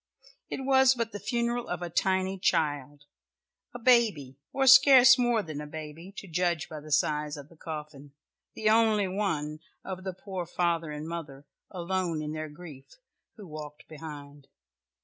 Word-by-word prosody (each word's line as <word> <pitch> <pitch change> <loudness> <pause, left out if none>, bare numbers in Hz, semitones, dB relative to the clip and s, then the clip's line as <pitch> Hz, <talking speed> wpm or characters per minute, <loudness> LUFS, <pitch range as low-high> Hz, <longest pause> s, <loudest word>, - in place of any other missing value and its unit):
It - - -4
was 265 -1 +4
but 230 -2 -2
the 205 - -6
funeral 240 +2 -2
of - - -4
a 175 - -4
tiny 190 +2 0
child, 145 -4 0 0.7
a 245 - -7
baby, 225 - +2 0.2
or 270 0 0
scarce 265 -1 +8
more 240 -3 +2
than 155 -4 -6
a 150 - -7
baby 155 +4 -9
to 195 - -8
judge 170 -2 -1
by 155 - -8
the 155 +1 -12
size 150 +1 0
of 145 0 -11
the 165 - -18
coffin, 150 -3 -8 0.4
"the 215 - -2
only 215 -2 +4
one" 165 -6 -2 0.3
of 185 -1 -6
the 190 -1 -4
poor 185 -1 -6
father 170 -2 -1
and 150 +1 -6
mother 145 -5 -7 0.2
alone 180 -2 -2
in 150 - -4
their 155 0 -5
grief, 150 -4 -13 0.4
who 210 - -11
walked 150 -1 -9
behind. 145 -3 -10
170 Hz, 165 wpm, -28 LUFS, 150-210 Hz, 0.7 s, scarce